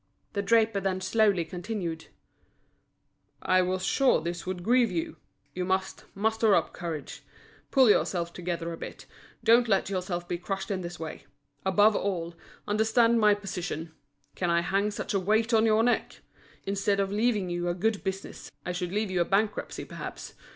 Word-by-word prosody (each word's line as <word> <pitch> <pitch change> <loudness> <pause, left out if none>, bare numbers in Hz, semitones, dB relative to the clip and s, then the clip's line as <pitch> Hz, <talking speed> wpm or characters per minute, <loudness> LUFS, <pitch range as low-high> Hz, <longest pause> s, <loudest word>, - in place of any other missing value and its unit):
The 200 - 0
draper 220 0 +3
then 190 -1 -1
slowly 195 -2 +2
continued: 175 -2 -5 1.3
"I 185 0 +3
was 185 +1 -1
sure 270 -2 +3
this 170 +2 -5
would 180 -1 -4
grieve 240 +2 +4
you. 165 -2 -3 0.4
You 180 - -2
must 190 +1 -2
muster 220 0 +3
up - - 0
courage. 165 -5 -6 0.5
Pull 265 -3 +5
yourself 170 -4 0
together 170 -1 -3
a - - -7
bit, - - -8 0.4
don't 235 +1 +5
let 195 -2 +1
yourself 180 -2 -3
be 175 - -3
crushed 195 +2 -4
in 190 -2 -1
this 175 -1 -7
way. 160 -1 -7 0.4
Above 205 +3 +4
all, 170 -4 -2 0.3
understand 225 +2 +3
my 210 -1 +5
position. 180 -5 -5 0.4
Can 180 - -1
I 170 0 +3
hang 195 +4 +1
such 210 - -4
a 195 - +2
weight 220 +5 +1
on 225 0 +5
your 220 +1 +4
neck? 245 +1 0 0.4
Instead 200 0 0
of 195 0 0
leaving 210 -3 +1
you 175 0 -2
a 175 - -1
good 210 +3 0
business, 195 0 -5 0.2
I 180 - -2
should 180 0 -3
leave 210 0 -1
you 180 -1 +1
a - - +2
bankruptcy 205 +3 -1
perhaps. - - -8
195 Hz, 170 wpm, -28 LUFS, 175-215 Hz, 1.3 s, Pull